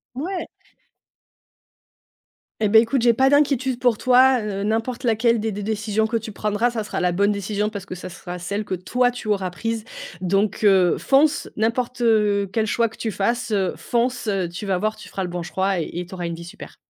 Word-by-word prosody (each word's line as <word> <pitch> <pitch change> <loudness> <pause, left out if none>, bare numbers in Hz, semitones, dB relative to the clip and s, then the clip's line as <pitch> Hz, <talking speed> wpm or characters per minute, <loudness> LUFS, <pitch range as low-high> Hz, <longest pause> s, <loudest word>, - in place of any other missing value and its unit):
Mouais! 355 +8 -4 2.1
Eh 215 - +3
beh, 220 +2 +7
écoute, 240 +3 0
j'ai 240 -1 +5
pas 265 +3 +3
d'inquiétude 270 -3 +2
pour 245 -4 +2
toi, 255 +1 +5
heu, 200 -2 -3
n'importe 225 +4 -2
laquelle 230 0 +2
des 220 0 -2
des 205 +1 -5
décisions 220 +1 0
que 230 - 0
tu 220 -1 -7
prendras, 210 +4 0
ça 225 -3 -3
sera - - -4
la 180 -1 +1
bonne 200 +3 +2
décision 205 +1 -1
parce 200 -3 -7
que 185 - -7
ça 180 - -8
sera 180 0 -8
celle 200 +5 -3
que 190 - -2
toi, 245 +7 +1
tu 240 -3 -7
auras 195 -3 0
prise. 225 +4 -4 0.3
Donc, 195 +4 0
heu, 190 -3 +5
fonce! 285 +2 +2
N'importe, 235 +3 -1
heu, 210 -4 +2
quel 220 0 +1
choix 230 +1 +1
que 225 - -16
tu 225 - -3
fasses, 235 +4 -1
heu, 195 -3 +1
fonce! 245 0 -1
Heu, 190 -4 0
tu 180 +5 -7
vas 190 -2 0
voir, 215 +4 -1
tu - - -11
feras 190 - -4
le 180 - -4
bon 175 0 -4
choix 190 +2 -1
et 160 - -3
et 180 - -4
tu 175 - -13
auras 180 -2 -4
une 170 - -4
vie 170 - -9
super. 170 - -11
215 Hz, 215 wpm, -22 LUFS, 195-235 Hz, 2.1 s, beh